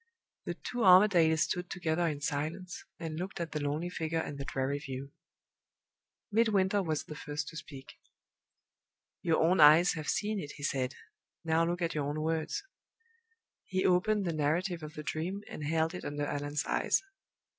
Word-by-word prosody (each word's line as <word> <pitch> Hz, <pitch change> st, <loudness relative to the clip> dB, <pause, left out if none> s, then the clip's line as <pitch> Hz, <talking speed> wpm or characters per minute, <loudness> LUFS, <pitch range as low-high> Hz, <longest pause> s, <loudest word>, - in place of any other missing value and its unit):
The -, -, -3 dB
two 245 Hz, -, -6 dB
Armadales 180 Hz, -4 st, +6 dB
stood 180 Hz, 0 st, -3 dB
together 170 Hz, -1 st, 0 dB
in 145 Hz, -3 st, -3 dB
silence, 160 Hz, +6 st, -3 dB
and 160 Hz, -1 st, -5 dB
looked 185 Hz, +1 st, -5 dB
at 170 Hz, -2 st, -3 dB
the 150 Hz, -, -2 dB
lonely 150 Hz, +4 st, -2 dB
figure 160 Hz, -1 st, -2 dB
and 145 Hz, -3 st, -3 dB
the 140 Hz, -, -4 dB
dreary 135 Hz, +1 st, -1 dB
view. 135 Hz, -1 st, -7 dB, 1.2 s
Midwinter 205 Hz, -3 st, +3 dB
was 160 Hz, -5 st, -1 dB
the -, -, -8 dB
first 150 Hz, -1 st, -4 dB
to 165 Hz, -, -9 dB
speak. 135 Hz, -4 st, -10 dB, 1.2 s
"Your 165 Hz, -2 st, +2 dB
own 180 Hz, +3 st, +3 dB
eyes 155 Hz, +3 st, +8 dB
have 155 Hz, -3 st, -4 dB
seen 210 Hz, 0 st, 0 dB
it," 145 Hz, -4 st, -6 dB
he 145 Hz, -, -11 dB
said. 130 Hz, -2 st, -1 dB, 0.5 s
"Now 160 Hz, 0 st, +3 dB
look 175 Hz, +1 st, -1 dB
at 165 Hz, -, -1 dB
our 150 Hz, -, 0 dB
own 150 Hz, +1 st, -3 dB
words." 160 Hz, -, -1 dB, 1.0 s
He 185 Hz, -1 st, 0 dB
opened 195 Hz, +3 st, +3 dB
the 170 Hz, -, -1 dB
narrative 165 Hz, +4 st, 0 dB
of 155 Hz, 0 st, -8 dB
the 150 Hz, -, -6 dB
Dream, 180 Hz, +7 st, -3 dB
and 155 Hz, -, -7 dB
held 160 Hz, +2 st, +1 dB
it 180 Hz, -, -6 dB
under 145 Hz, 0 st, -2 dB
Allan's 145 Hz, +1 st, -2 dB
eyes. -, -, +1 dB
160 Hz, 170 wpm, -31 LUFS, 150-180 Hz, 1.2 s, eyes